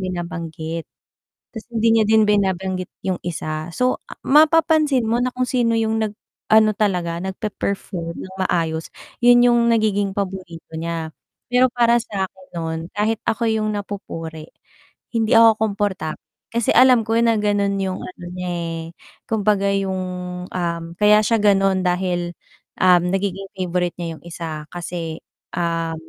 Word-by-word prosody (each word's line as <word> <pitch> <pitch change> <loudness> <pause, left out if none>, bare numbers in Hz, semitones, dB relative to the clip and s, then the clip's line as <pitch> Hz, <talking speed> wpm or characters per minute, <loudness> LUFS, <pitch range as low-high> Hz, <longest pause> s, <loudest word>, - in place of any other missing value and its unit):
binabanggit. 170 -2 -5 0.7
Ta's 225 - -8
hindi 225 0 +3
niya 215 - +4
din 220 -1 +5
binabanggit 190 -2 0 0.2
'yung 185 -2 0
isa. 155 -1 -4
So, 250 0 0 0.2
mapapansin 305 -3 +4
mo 230 +2 +1
na 255 - 0
kung 255 0 0
sino 240 -3 +1
yung 220 0 0
nag-ano 215 +1 +1
talaga 180 -5 -1
nagpe-perform 190 -3 -4
ng 190 0 -9
maayos 160 -1 -1 0.3
yun 245 0 +7
yung 240 -1 +4
nagiging 205 -3 +2
paborito 185 -5 -5
niya 165 -1 -3 0.4
pero 250 +1 +4
para 235 -1 +4
sakin 190 -4 -4
nun 160 -1 -3
kahit 215 +2 0
ako 230 +1 0
yung 215 -1 0
napupuri 165 -6 -6 0.6
hindi 225 -1 +1
ako 225 -1 +7
komportable 200 -6 -1 0.3
kasi 235 -1 +1
alam 250 -4 +6
ko 225 - 0
na 230 -2 +3
ganun 205 -1 +1
yung 190 -1 -2
ano 180 -1 -9
niya, 180 0 -4
eh, 165 -1 -3 0.5
kung 220 -2 +1
baga 200 -1 +3
yung, 190 -1 -1 0.5
um, 170 -2 -2 0.2
kaya 210 0 +6
siya 230 0 +2
gano'n 195 -2 +3
dahil, 175 -1 -1 0.5
um, 180 -2 +6
nagiging 195 +1 -2
favourite 180 -1 -1
niya 170 -2 -5
yung - - -26
isa 160 -3 -6
kasi 170 -2 -5 0.3
ah, 165 -1 -1
195 Hz, 140 wpm, -21 LUFS, 170-220 Hz, 0.7 s, yun